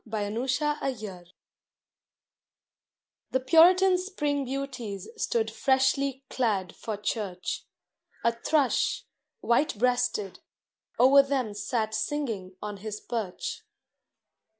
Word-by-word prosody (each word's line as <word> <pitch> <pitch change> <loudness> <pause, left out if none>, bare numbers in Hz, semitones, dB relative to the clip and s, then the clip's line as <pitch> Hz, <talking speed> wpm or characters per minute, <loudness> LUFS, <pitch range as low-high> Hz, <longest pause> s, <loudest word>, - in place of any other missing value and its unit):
THE 220 +3 -3
SPRING 270 0 0
BEAUTIES 190 -5 -9 2.0
The 260 - +1
Puritan 360 +7 +6
Spring 295 -7 -1
Beauties 255 -6 -5
stood 450 0 0
freshly 265 0 +1
clad 205 -9 -1
for 220 -2 -5
church; 190 -4 -3 0.6
A 235 - +4
Thrush, 260 +4 +1 0.4
white 235 +1 +2
breasted, 245 -5 0 0.6
o'er 270 +3 +8
them 265 -6 -1
sat 220 +1 -2
singing 220 -6 -3
on 210 -1 -5
his 210 +1 -6
perch. 215 -7 -4
245 Hz, 95 wpm, -28 LUFS, 210-275 Hz, 2.0 s, o'er